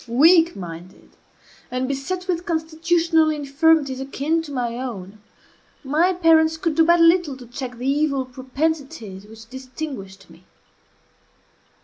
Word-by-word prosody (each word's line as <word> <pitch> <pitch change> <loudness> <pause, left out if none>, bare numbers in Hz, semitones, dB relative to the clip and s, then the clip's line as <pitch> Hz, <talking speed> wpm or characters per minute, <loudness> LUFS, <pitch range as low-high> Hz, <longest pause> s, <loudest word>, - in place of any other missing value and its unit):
Weak 325 +7 +5
minded, 175 0 -10 0.6
and 255 +1 -2
beset 315 +8 -4
with 350 -2 -1
constitutional 325 0 +1
infirmities 290 -2 +1
akin 285 +4 -1
to 315 -3 -10
my 240 -3 -2
own, 210 -5 -7 0.6
my 310 +7 +2
parents 320 -2 +3
could 330 -1 -1
do 325 - +4
but 340 +1 +4
little 330 -4 +3
to 250 - -12
check 245 +1 -7
the 245 - -6
evil 275 -1 +1
propensities 260 -5 -4
which 220 +1 -14
distinguished 255 - -8
me. - - -18
280 Hz, 125 wpm, -22 LUFS, 250-325 Hz, 0.6 s, Weak